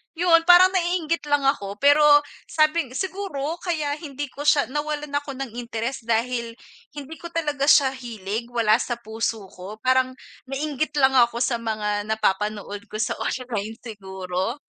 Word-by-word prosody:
Yun 330 -1 +4
parang 360 +1 +8
naiinggit 345 -3 0
lang 290 -1 +2
ako 205 -8 0
pero 285 +2 +5 0.4
sabi 310 -1 +2
siguro 355 -5 -3
kaya 305 -5 -1
hindi 290 -2 -6
ko 290 - -7
siya 300 -2 +4
nawalan 295 0 -3
ako 285 -1 -3
ng 245 -4 -6
interes 235 +1 -4
dahil 235 0 -1 0.4
hindi 290 +2 -8
ko 340 - -7
talaga 295 -4 -1
siya 275 -3 +6
hilig, 230 -2 -5
wala 225 -3 +3
sa 240 - -2
puso 225 -1 -3
ko, 190 +4 -9
parang 255 0 +3 0.4
nainggit 295 +2 -3
lang 265 0 +4
ako 235 0 +3
sa 240 -1 0
mga 210 -2 -2
napapanood 210 -1 -1
ko - - -8
sa 225 - -1
online 225 -4 -3
siguro. 190 0 -4
260 Hz, 150 wpm, -23 LUFS, 220-300 Hz, 0.4 s, parang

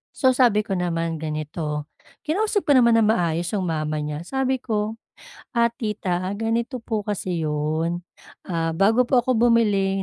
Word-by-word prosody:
so 260 -2 +4
sabi 230 -5 +4
ko 205 - -9
naman, 165 -2 -1
ganito 150 -1 -4 0.3
kinausap 410 +5 0
ko - - +4
naman 235 -2 +5
ng 215 - +3
maayos 170 -3 0
yung 190 -2 -1
mama 155 -1 -1
niya 150 +1 -4
sabi 265 +4 0
ko, 215 -2 -2 0.6
"Ah, 235 0 +4
tita 190 -6 -2
ganito 230 +3 -1
po 220 -2 -2
kasi 185 -4 -2
yun, 155 +3 -1 0.5
ah, 165 -2 -1
bago 220 +6 +4
po 250 -3 +4
ako 255 -3 +1
bumili 195 -4 +2
195 Hz, 155 wpm, -23 LUFS, 165-235 Hz, 0.6 s, naman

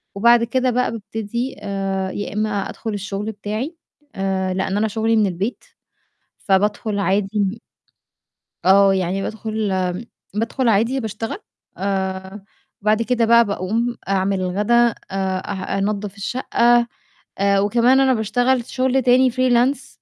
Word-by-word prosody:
وبعد 235 +3 +5
كده 255 +2 +1
بقى 250 -1 +1
بابتدي 225 +3 -4
آآ 195 -1 -2
يا 205 - -5
إمّا 215 +1 0 0.2
أدخُل 220 -2 -5
الشُغل 205 +1 -4
بتاعي 215 - -4 0.4
آآ 190 -1 -1
لإن 190 +1 -1
أنا 220 - +2
شُغلي 220 +2 0
من 215 -1 +4
البيت، 190 +6 -3 0.8
فبادخُل 205 +1 0
عادي 200 +1 0
م 200 +2 0 1.1
آه، 195 +1 +6
يعني 190 +1 -1
بادخُل 220 0 -3
آمم 185 +3 -1 0.3
بادخُل 230 +4 -1
عادي 230 +5 +2
باشتغل 220 - -4 0.4
آآ 190 0 -3 0.4
بعد 215 +2 +2
كده 235 0 +1
بقى 235 0 +6
باقوم 220 +5 -1
أعمل 195 0 +1
الغدا 200 +5 0
آآ 230 - -2 0.2
أه 190 0 -2
أنضَّف 200 0 -2
الشَقّة 240 +1 +2 0.5
آآ 200 0 +3
وكمان 240 +6 +3
أنا 265 -1 +4
باشتغل 245 +3 +1
شُغل 260 +1 +1
تاني 250 +1 +4
freelance. 255 +2 +1
210 Hz, 130 wpm, -20 LUFS, 195-235 Hz, 1.1 s, آه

